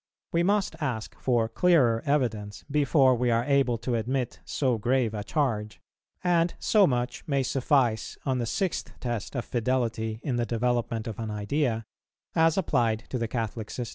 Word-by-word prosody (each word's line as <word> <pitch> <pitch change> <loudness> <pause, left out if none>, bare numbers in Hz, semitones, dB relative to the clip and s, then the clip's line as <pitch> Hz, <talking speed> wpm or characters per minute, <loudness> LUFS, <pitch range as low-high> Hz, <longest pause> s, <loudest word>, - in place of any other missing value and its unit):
We 170 - +2
must 195 -1 +1
ask 125 -7 -3
for 120 -3 +2
clearer 120 -4 +3
evidence 115 -8 -1
before 140 -2 +4
we 125 0 +1
are 115 0 +2
able 135 -3 +2
to 120 +2 -3
admit 120 +2 -1
so 130 -5 0
grave 120 0 +1
a 105 -1 -3
charge; 110 -5 -1 0.4
and 175 -1 +2
so 210 -3 +4
much 125 -1 -2
may 140 -3 +1
suffice 125 -4 +1
on 130 -2 0
the 120 - -1
Sixth 185 - -2
Test 120 0 -4
of 125 - -2
fidelity 115 -2 -1
in 125 -4 -1
the 120 - +1
development 120 -1 -1
of 115 -3 -6
an 110 -1 -3
idea, 115 +3 -1 0.5
as 165 +1 +3
applied 115 - +1
to 125 - -2
the 115 - -1
Catholic 110 -2 -3
system. 120 -3 -4
120 Hz, 170 wpm, -27 LUFS, 115-140 Hz, 0.5 s, before